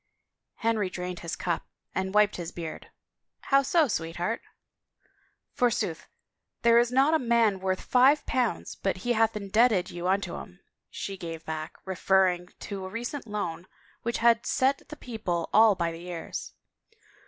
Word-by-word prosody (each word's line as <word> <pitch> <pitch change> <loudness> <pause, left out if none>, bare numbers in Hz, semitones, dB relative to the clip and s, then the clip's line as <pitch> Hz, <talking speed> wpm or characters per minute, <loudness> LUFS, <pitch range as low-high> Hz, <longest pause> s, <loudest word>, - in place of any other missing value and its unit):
Henry 220 -4 0
drained 180 -1 -5
his 170 -1 -4
cup 175 -2 -2 0.3
and 190 0 -1
wiped 210 -1 +4
his 170 -2 -5
beard. 165 -2 -7 0.3
" - - -59
How 275 0 +7
so, 310 +3 +3
Sweetheart?" 175 +2 -2 0.6
" - - -40
Forsooth, 225 -9 0 0.6
there 235 0 +6
is 240 0 +2
not 270 +5 +4
a 320 - +4
man 230 -5 +3
worth 185 0 -1
five 265 +4 +4
potmds 250 -3 -1
but 195 -2 0
he 245 - +3
hath 225 -1 +2
indebted 210 -1 +2
you 175 +1 -4
unto 195 +2 0
him," - - -10 0.3
she 195 -1 -5
gave 165 -2 -7
back, 155 0 -5
referrii^ 185 -1 +2
to 200 -2 -5
a 185 - -5
recent 240 +5 -5
loan 190 -4 -4 0.3
which 235 0 -1
had 235 0 +3
set 270 +2 +1
the 300 - -7
people 215 -10 -3
all 220 -1 +7
by 170 -2 -1
the 165 +2 -9
ears. 175 -2 -6
205 Hz, 160 wpm, -28 LUFS, 180-235 Hz, 0.6 s, How